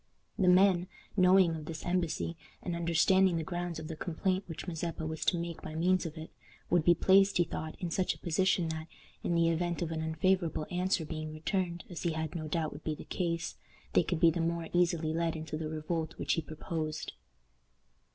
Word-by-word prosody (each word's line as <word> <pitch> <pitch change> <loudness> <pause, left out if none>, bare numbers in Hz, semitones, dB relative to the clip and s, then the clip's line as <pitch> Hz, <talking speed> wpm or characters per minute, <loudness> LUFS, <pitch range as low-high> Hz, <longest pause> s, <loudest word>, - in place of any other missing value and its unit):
The 185 - +3
men, 180 -1 +5 0.3
knowing 185 -3 +5
of 155 -1 -6
this 160 0 -6
embassy, 175 -2 -1 0.3
and 175 - -2
understanding 170 +2 +3
the 160 - -1
grounds 175 0 -3
of 160 -1 -6
the 160 - -5
complaint 185 +4 -1
which 165 -2 -6
Mazeppa 165 -1 -3
was 160 0 -3
to 175 - +3
make 170 -1 -4
by 155 - -7
means 180 +2 +2
of 155 - -9
it, 160 0 -8 0.4
would 175 -2 +4
be 175 +2 +6
placed, 195 +3 +5
he 175 - +5
thought, 160 -2 -5
in 175 -2 -3
such 185 +2 +1
a - - -15
position 175 0 +1
that, 160 0 -4 0.4
in 170 - 0
the 165 0 +4
event 170 +1 0
of 165 - -3
an 160 -1 -2
unfavorable 160 0 +1
answer 180 -2 +1
being 155 0 -5
returned, 170 +2 -2
as 175 - -7
he 170 -2 0
had 160 -1 -3
no 155 -2 -4
doubt 155 0 -1
would 145 - -10
be 155 - -1
the - - -9
case, 170 -2 -2 0.4
they - - +6
could 170 0 -1
be 165 -1 +6
the 170 - -1
more 165 0 -1
easily 170 -3 +2
led 165 0 0
into 155 -1 -5
the 155 0 -3
revolt 160 +1 -3
which - - 0
he 165 - 0
proposed. 155 0 -4
170 Hz, 210 wpm, -31 LUFS, 160-175 Hz, 0.4 s, be